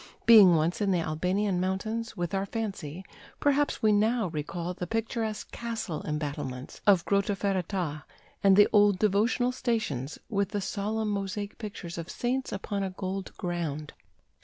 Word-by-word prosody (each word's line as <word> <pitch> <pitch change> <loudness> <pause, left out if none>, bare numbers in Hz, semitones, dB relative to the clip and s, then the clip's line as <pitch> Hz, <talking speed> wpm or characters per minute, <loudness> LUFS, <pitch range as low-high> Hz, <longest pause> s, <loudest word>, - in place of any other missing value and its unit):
Being 205 -7 +9
once 165 +5 +1
in 200 - +2
the 185 - +3
Albanian 180 +5 0
mountains, 215 +5 -2
with 175 +2 -2
our 195 0 0
fancy, 190 -6 -4 0.3
perhaps 290 -2 +1
we 215 - +5
now 215 0 +2
recall 170 +3 -4
the 180 0 -5
picturesque 225 0 -2
castle 225 -8 -4
embattlements 145 -4 -4
of 185 -4 +5
Grotta 200 +2 +1
Ferrata, 185 -6 -2 0.4
and 195 -1 +7
the 205 +1 +7
old 205 -2 +5
devotional 220 +5 +2
stations 220 - -2
with 200 -3 0
the 205 -1 -2
solemn 215 +2 -2
mosaic 200 0 -3
pictures 185 -6 -6
of 165 - -6
saints 255 +2 -2
upon 200 0 -3
a 195 - -1
gold 190 +1 -4
ground. 165 -5 -3
195 Hz, 150 wpm, -28 LUFS, 175-215 Hz, 0.4 s, Being